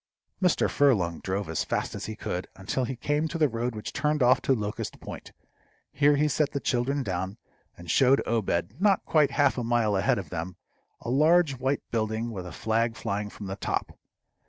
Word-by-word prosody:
Mr. 180 -3 +3
Furlong 100 - +2
drove 95 0 -3
as 80 -1 -1
fast - - -2
as - - -5
he 110 - -5
could, 90 -4 -4
until 105 +7 -2
he 130 - -4
came 145 +6 0
to 165 - -4
the 155 -2 +4
road 120 -1 -3
which 105 - -6
turned 150 -1 +1
off 130 +1 +5
to 135 - +2
Locust 105 -2 -4
Point. - - -9 0.6
Here 145 0 +4
he 150 +2 +2
set 150 0 0
the 140 - -1
children 135 +2 0
down, 95 0 -3 0.4
and 85 - -12
showed 135 +1 +5
Obed, 110 - -1
not 200 -2 +3
quite 150 -3 +3
half 140 -3 +2
a - - -2
mile 115 -3 +2
ahead 95 - +2
of - - -6
them, 85 +3 -4 0.5
a 120 - -4
large 155 0 +4
white 135 +2 0
building 110 +1 -1
with 95 -4 -6
a - - -8
flag 115 +1 0
flying 105 -1 -3
from 105 - -9
the 95 0 -4
top. 100 - -3
120 Hz, 200 wpm, -27 LUFS, 105-140 Hz, 0.6 s, off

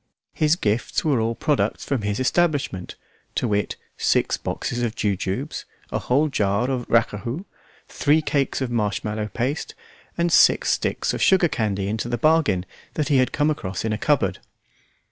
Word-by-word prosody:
His 155 +1 +3
gifts 110 - -1
were 140 -7 +2
all 115 +1 0
products 150 +3 0
from 135 -5 -1
his 105 +1 -2
establishment, 135 - 0 0.4
to - - 0
wit: 105 -2 0 0.2
six - - +2
boxes 120 - -3
of 115 -1 -1
jujubes, 100 +7 -2 0.3
a - - -1
whole 140 +5 +2
jar 110 -1 0
of 125 -2 -3
racahout, 115 - 0 0.4
three 150 +1 +2
cakes 140 -2 0
of 130 -2 -2
marshmallow 105 -1 -1
paste, 130 +7 -3 0.4
and 170 0 +1
six - - +5
sticks - - 0
of - - -3
sugar 185 -2 +5
candy 100 -8 -1
into 110 +3 -2
the 120 - -1
bargain 155 - +2 0.3
that 150 0 -1
he 140 - +4
had 130 -1 +2
come 150 +1 +2
across 95 -9 -4
in 110 - 0
a - - -1
cupboard. - - +1
120 Hz, 165 wpm, -23 LUFS, 105-150 Hz, 0.4 s, six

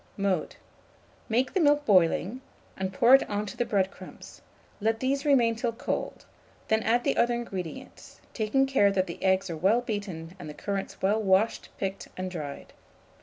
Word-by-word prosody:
Mode. 195 -4 -1 0.7
Make 250 +3 +1
the 385 - +1
milk 295 -2 +3
boiling, 190 +5 +3 0.3
and 190 0 -3
pour 235 +6 +4
it 270 - +6
on 205 0 -1
the 215 - -2
bread 195 -4 +1
crumbs; - - -12 0.4
let 225 +1 0
these 275 +3 -1
remain 245 -6 +4
till 230 +1 -2
cold; 230 - -4 0.4
then 220 0 +3
add 235 +2 +2
the - - 0
other 240 0 +3
ingredients, 190 -8 -7
taking 240 +5 +1
care 235 -7 +3
that 190 -1 +1
the 170 - -8
eggs 190 0 +2
are - - -3
well 200 +8 +3
beaten 190 -7 -5
and 155 - -8
the 150 - -9
currants 200 -2 -5
well 210 +3 +2
washed, 195 +2 +1
picked, 195 0 -4
and 185 0 -4
dried. 150 -5 -7
210 Hz, 170 wpm, -27 LUFS, 190-240 Hz, 0.7 s, it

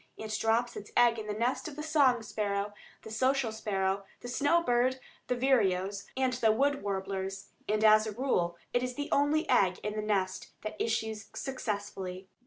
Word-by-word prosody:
It 215 0 -4
drops 230 +2 +1
its 205 - -8
egg 235 -1 +5
in 215 - -6
the 210 - -2
nest 240 +8 0
of 300 - -7
the 300 - -5
song 280 -7 +3
sparrow, 205 -1 -2 0.3
the 220 - -9
social 260 +1 +1
sparrow, 195 -2 -1 0.2
the - - -7
snow 290 +7 +2
bird, 250 0 +2 0.3
the 250 - +1
vireos, 200 -6 +1
and 260 -1 +2
the 235 -3 +3
wood 280 +5 +1
warblers, 195 0 -3 0.2
and 215 +1 +1
as 215 0 +6
a - - -2
rule 200 -8 0 0.2
it 245 - +2
is 250 0 -3
the 290 +2 -4
only 290 +3 +2
egg 190 -7 +3
in 210 - -2
the 215 - -1
nest 195 -3 -1
that 215 - -4
issues 220 -2 -2
successfully. 200 -7 -4
220 Hz, 185 wpm, -30 LUFS, 200-255 Hz, 0.3 s, as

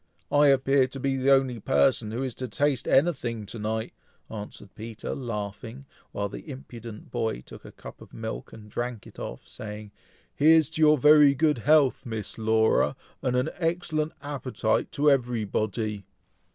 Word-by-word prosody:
I 145 0 +5
appear 135 -1 +4
to 135 +1 -8
be 135 0 0
the 135 +1 +1
only 135 -3 +3
person 130 -1 +2
who 120 +5 -3
is 130 -2 -3
to 130 - -2
taste 140 -1 0
anything 130 -8 +1
to 110 +3 -8
night," 110 +1 -3 0.4
answered 105 -2 -8
Peter, 110 0 -6
laughing, 115 +1 -6 0.3
while 100 0 -2
the 125 - -10
impudent 120 -5 -9
boy 115 - -2
took - - -13
a - - -10
cup - - -12
of - - -14
milk, 110 0 -6
and 105 -1 -12
drank 120 +1 -4
it - - -13
off, - - -7
saying, 105 -1 -8 0.4
"Here's 160 +1 +5
to 160 - -4
your 150 -1 +6
very 150 0 +6
good 150 -2 +2
health, 145 +1 +3
Miss 110 -2 -5
Laura, 110 0 +2 0.3
and 125 -2 0
an 125 +1 0
excellent 165 -2 -1
appetite 130 -6 -1
to 145 +1 +4
everybody!" 110 -4 -1
125 Hz, 165 wpm, -26 LUFS, 110-140 Hz, 0.4 s, your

